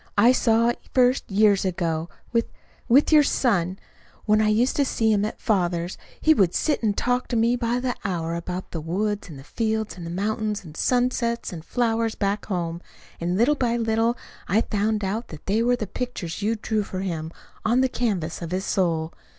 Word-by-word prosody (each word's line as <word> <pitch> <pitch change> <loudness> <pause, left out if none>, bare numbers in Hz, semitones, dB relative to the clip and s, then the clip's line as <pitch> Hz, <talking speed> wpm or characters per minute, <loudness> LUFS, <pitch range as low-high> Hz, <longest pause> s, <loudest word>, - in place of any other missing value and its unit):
I 230 +5 +7
saw 230 -2 +3
it 240 - -2 0.2
first 255 0 +3
years 205 0 +4
ago, 170 -3 -1 0.2
with 230 -1 +2 0.4
with 275 +7 +5
your 305 -1 +8
son, 195 -10 +1 0.5
when 215 0 +4
I 215 - +3
used 225 +5 +2
to 285 - +4
see 225 -4 +1
him 205 -1 +2
at 215 - -5
father's. 175 -4 0 0.2
He 315 - +5
would 190 - +2
sit 300 - +1
and 210 -3 0
talk 250 +1 0
to 245 - -2
me 230 +2 +3
by 240 0 0
the 250 0 -1
hour 170 -4 -2
about 180 +2 -5
the 165 - -4
woods 200 +5 -2
and 135 -4 -10
fields 220 -1 -2
and 170 -1 -6
mountains, 210 +1 -1
the 165 - -11
sunsets 245 -1 0
and 165 - -6
the - - -25
flowers 230 -2 0
back 200 +1 -1
home; 170 -3 -2 0.4
and 175 +2 -1
little 240 +7 +4
by 240 -4 0
little 225 +1 +1 0.3
I 205 +5 +3
found 210 -1 -1
out 210 +5 -2
that 155 - -11
they 210 +4 +1
were 245 +1 +3
the 225 - -3
pictures 205 -5 -5
you 220 +3 +1
drew 215 0 -1
for 190 -2 -5
him 165 -4 -3 0.3
on 240 +3 +3
the 260 - +4
canvas 200 -11 -2
of 170 - -4
his 185 +3 -2
soul. 165 -4 0
215 Hz, 200 wpm, -24 LUFS, 180-235 Hz, 0.5 s, your